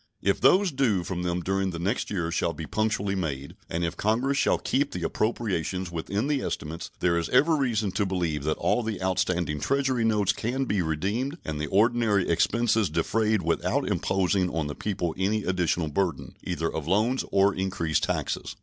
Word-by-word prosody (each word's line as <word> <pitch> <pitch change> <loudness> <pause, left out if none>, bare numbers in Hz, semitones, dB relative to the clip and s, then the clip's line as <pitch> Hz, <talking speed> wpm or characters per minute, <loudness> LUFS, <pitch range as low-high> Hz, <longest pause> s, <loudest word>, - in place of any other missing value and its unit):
If - - +1
those 190 0 +5
due 115 -10 +1
from 90 0 -4
them 90 0 -1
during 95 +2 0
the 85 - -5
next 90 +5 -1
year 85 -5 -2
shall - - 0
be 80 +1 -6
punctually 110 0 0
made, 70 -7 -3
and 85 +1 -2
if 85 - -2
Congress 120 +6 +1
shall - - +3
keep 140 +2 0
the 90 - -4
appropriations 95 -4 -1
within 100 +7 -2
the 145 -2 0
estimates, 80 +2 -4
there 85 -1 +3
is 85 - -3
every 155 +6 +4
reason 110 -7 0
to 105 +2 0
believe 85 -6 -1
that 80 - 0
all - - +1
the 110 -4 -3
outstanding 90 -4 0
Treasury 135 - +1
notes 105 -3 +2
can 130 +4 -2
be 105 -6 0
redeemed 100 - -1
and 75 -1 -3
the 75 - -2
ordinary 110 -1 +2
expenses 110 +4 +2
defrayed 110 -3 +1
without 85 +1 0
imposing 95 -1 +1
on 80 -3 -2
the 75 - -4
people 90 -4 -2
any 105 +3 +1
additional 90 -3 0
burden, 80 0 -2
either 80 -2 -2
of 80 -1 -4
loans 110 +8 +2
or 100 0 +4
increased 90 -4 -1
taxes. - - -3
95 Hz, 185 wpm, -26 LUFS, 85-110 Hz, -, those